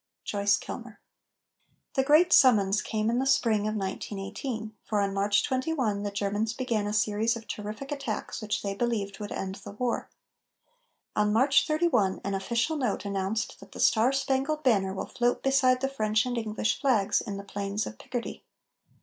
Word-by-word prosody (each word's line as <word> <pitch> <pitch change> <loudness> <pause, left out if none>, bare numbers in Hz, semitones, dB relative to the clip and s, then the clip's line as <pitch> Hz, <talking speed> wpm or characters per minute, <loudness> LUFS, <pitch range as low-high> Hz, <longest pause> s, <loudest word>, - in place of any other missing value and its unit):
JOYCE 200 0 +2
KILMER. - - -8 0.9
The 265 - +3
great 310 +6 +5
summons 210 -6 +5
came 215 0 -1
in 240 - +1
the 265 - 0
spring 215 -5 +2
of 215 - -2
1918, 210 +3 -4
for 210 - -1
on 200 -1 0
March 200 +1 +2
21 260 -6 0
the 205 - -2
Germans 205 +2 -1
began 235 -5 -1
a - - -2
series 215 +2 +1
of 225 -1 -12
terrific 215 +7 -6
attacks 275 -8 -4
which 210 -1 -2
they 200 -1 -2
believed 200 -3 -2
would 205 -1 -6
end 190 0 -4
the - - -8
war. 240 +3 -2 1.1
On 210 0 +2
March 265 +7 +4
31 305 - +2
an 200 - -2
official 235 +10 0
note 245 -7 -1
announced 200 +2 -2
that - - -14
"the - - -9
Star 230 +3 +4
Spangled 275 +3 0
Banner 200 -7 +3
will - - -3
float 245 -1 0
beside 260 -2 +3
the 270 - +1
French 220 -4 +1
and 250 -1 -2
English 220 -1 -1
flags 230 -8 +2
in 200 -3 -5
the 200 - -7
plains 200 +1 -3
of 110 - -8
Picardy." 245 -2 -5
220 Hz, 175 wpm, -28 LUFS, 205-255 Hz, 1.1 s, great